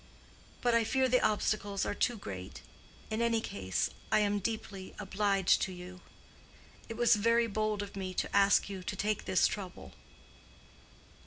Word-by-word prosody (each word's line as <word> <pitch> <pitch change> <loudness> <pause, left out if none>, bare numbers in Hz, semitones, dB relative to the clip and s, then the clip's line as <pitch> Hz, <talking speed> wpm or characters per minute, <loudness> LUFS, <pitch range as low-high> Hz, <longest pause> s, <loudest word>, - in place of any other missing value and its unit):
But 240 -1 +2
I 230 0 +4
fear 260 +4 +2
the 255 0 +3
obstacles 205 -2 0
are - - -1
too 240 +3 0
great. 95 - -8 0.5
In 220 +1 -1
any 230 -1 +2
case, 95 - -2 0.2
I - - +5
am 205 0 +1
deeply 200 -2 -5
obliged 195 -1 +2
to 190 - -1
you. 180 0 -10 0.9
It 225 - -6
was 240 -2 +5
very 230 +2 +3
bold 215 -1 -1
of 200 - -9
me 185 -2 -4
to - - -2
ask 200 0 +5
you 195 -2 -6
to 180 - -4
take 210 +1 -1
this 180 - +3
trouble." 190 -3 -4
205 Hz, 160 wpm, -32 LUFS, 190-225 Hz, 0.9 s, I